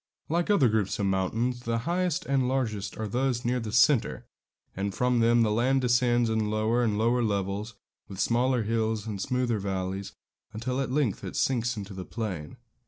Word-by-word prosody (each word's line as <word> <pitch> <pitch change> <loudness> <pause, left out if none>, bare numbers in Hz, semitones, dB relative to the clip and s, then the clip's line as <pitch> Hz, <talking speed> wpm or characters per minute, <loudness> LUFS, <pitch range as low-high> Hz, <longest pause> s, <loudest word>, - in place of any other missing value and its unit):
Like 170 +4 0
other 200 -11 +5
groups 110 -3 0
of 100 - -1
mountains, 110 +6 0
the 115 -1 -2
highest 180 0 0
and 135 -2 +1
largest 115 -6 -2
are 110 - -3
those 125 +2 -1
near 125 +1 +1
the 110 -2 -5
centre, 125 +2 +3 0.5
and 100 0 -3
from 125 -1 +2
them 115 0 +4
the 110 - +1
land 130 +5 +2
descends 120 -1 +3
in 110 -1 0
lower 110 +3 +1
and 105 -3 +1
lower 120 +3 +2
levels, 100 0 -2 0.3
with 95 -2 -9
smaller 125 +1 +2
hills 110 -1 -1
and 105 -3 -4
smoother 125 -3 0
valleys, 95 0 -3 0.4
until 125 +4 -2
at 130 - -3
length 135 -8 0
it - - -6
sinks 120 -2 0
into 100 -1 -6
the 95 -1 -6
plain. 95 -9 -5
115 Hz, 180 wpm, -28 LUFS, 105-125 Hz, 0.5 s, other